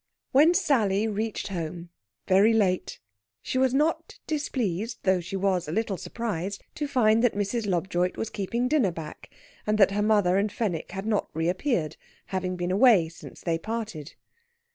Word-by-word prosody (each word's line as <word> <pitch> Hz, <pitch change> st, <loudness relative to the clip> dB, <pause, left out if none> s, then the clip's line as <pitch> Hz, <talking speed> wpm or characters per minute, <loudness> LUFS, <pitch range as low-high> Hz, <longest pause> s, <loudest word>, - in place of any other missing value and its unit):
When 310 Hz, +6 st, +5 dB
Sally 225 Hz, -, +2 dB
reached 220 Hz, 0 st, -3 dB
home, 170 Hz, -1 st, -5 dB, 0.4 s
very 200 Hz, +4 st, +5 dB
late, 190 Hz, -5 st, 0 dB, 0.4 s
she 255 Hz, -, -1 dB
was 260 Hz, -1 st, +3 dB
not 300 Hz, +5 st, 0 dB
displeased, 230 Hz, -, -2 dB
though 190 Hz, -1 st, +3 dB
she 180 Hz, +3 st, -6 dB
was 190 Hz, -3 st, 0 dB
a -, -, -4 dB
little 215 Hz, +2 st, -1 dB
surprised, 195 Hz, 0 st, -4 dB
to 295 Hz, -, -3 dB
find 230 Hz, -4 st, +3 dB
that 245 Hz, -, +3 dB
Mrs. 205 Hz, +2 st, -1 dB
Lobjoit 180 Hz, 0 st, 0 dB
was 225 Hz, -, -3 dB
keeping 235 Hz, +5 st, -1 dB
dinner 260 Hz, -8 st, +3 dB
back, 160 Hz, -2 st, -9 dB, 0.4 s
and 215 Hz, 0 st, +2 dB
that 195 Hz, -2 st, +5 dB
her 205 Hz, +1 st, 0 dB
mother 205 Hz, -4 st, +3 dB
and 205 Hz, +1 st, +1 dB
Fenwick 205 Hz, -7 st, -3 dB
had 195 Hz, +1 st, -5 dB
not 220 Hz, -2 st, 0 dB
reappeared, 170 Hz, -, -1 dB, 0.3 s
having 185 Hz, -1 st, -3 dB
been 175 Hz, 0 st, -2 dB
away 195 Hz, -5 st, +5 dB
since 165 Hz, -, -12 dB
they 165 Hz, -2 st, -1 dB
parted. 220 Hz, -7 st, -5 dB
205 Hz, 165 wpm, -26 LUFS, 180-230 Hz, 0.4 s, When